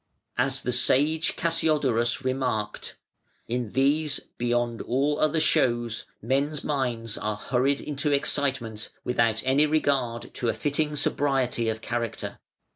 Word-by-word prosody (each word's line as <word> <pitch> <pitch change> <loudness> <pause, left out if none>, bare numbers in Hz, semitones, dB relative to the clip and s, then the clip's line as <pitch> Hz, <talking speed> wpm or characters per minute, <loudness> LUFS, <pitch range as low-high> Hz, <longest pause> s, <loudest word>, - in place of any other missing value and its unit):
As 135 +2 0
the 125 - 0
sage 145 +6 +3
Cassiodorus 145 -8 +1
remarked: 125 -5 -2 0.5
"In 120 -2 -2
these 145 +2 +2 0.2
beyond 120 -1 0
all 140 +4 0
other 155 +1 +2
shows, 120 -7 +1 0.2
men's 140 +5 0
minds 120 -6 -2
are 105 0 -2
hurried 130 +5 +1
into 145 0 -2
excitement, 135 -6 -1
without 115 -3 +1
any 140 +3 +4
regard 135 -6 0
to 120 - -1
a - - 0
fitting 150 +1 0
sobriety 135 -5 +1
of 110 0 -3
character. 120 -1 -3
130 Hz, 120 wpm, -26 LUFS, 120-145 Hz, 0.5 s, any